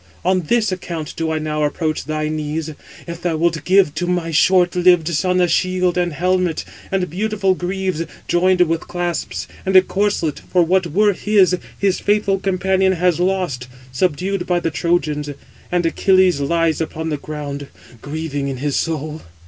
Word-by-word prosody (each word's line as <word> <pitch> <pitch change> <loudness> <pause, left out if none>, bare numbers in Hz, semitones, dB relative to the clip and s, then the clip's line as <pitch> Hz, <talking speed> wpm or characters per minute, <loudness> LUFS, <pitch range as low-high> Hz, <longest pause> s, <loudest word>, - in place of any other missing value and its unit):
On 185 0 +3
this 220 +5 +1
account 170 -4 -5
do 165 -1 -2
I 160 - 0
now 155 -1 -2
approach 155 0 -1
thy 155 +1 -2
knees, 155 +1 -3 0.3
if 170 0 -7
thou 170 -3 -1
wilt 165 0 0
give 185 -5 +4
to 175 +3 -2
my 175 -2 -1
short 180 +3 +3
lived 175 -2 +4
son 180 +3 +1
a 180 - +4
shield 185 +1 +1
and 175 -1 0
helmet, 180 0 0 0.3
and 190 -2 0
beautiful 200 +2 0
greaves, 185 -2 -2 0.2
joined 180 +1 +3
with 165 -1 +1
clasps, 175 -2 -3 0.2
and 190 0 -1
a 185 - +10
corslet: 195 -5 -1
for 180 -1 +1
what 180 +1 +2
were 205 +6 +3
his, 195 -2 +3 0.2
his 195 -2 +1
faithful 205 -1 +1
companion 190 0 +1
has 180 -1 +1
lost, 180 -9 -1 0.2
subdued 180 +6 -1
by 180 -1 +2
the 165 -1 -2
Trojans; 155 -3 0 0.4
and 175 -1 +1
he - - +4
(Achilles) 185 -3 +3
lies 165 +2 +1
upon 160 0 -3
the 150 - -1
ground, 145 -1 -6 0.3
grieving 145 -1 -4
in 135 -1 -3
his 145 +1 -2
soul." 155 -1 -2
175 Hz, 170 wpm, -19 LUFS, 155-185 Hz, 0.4 s, a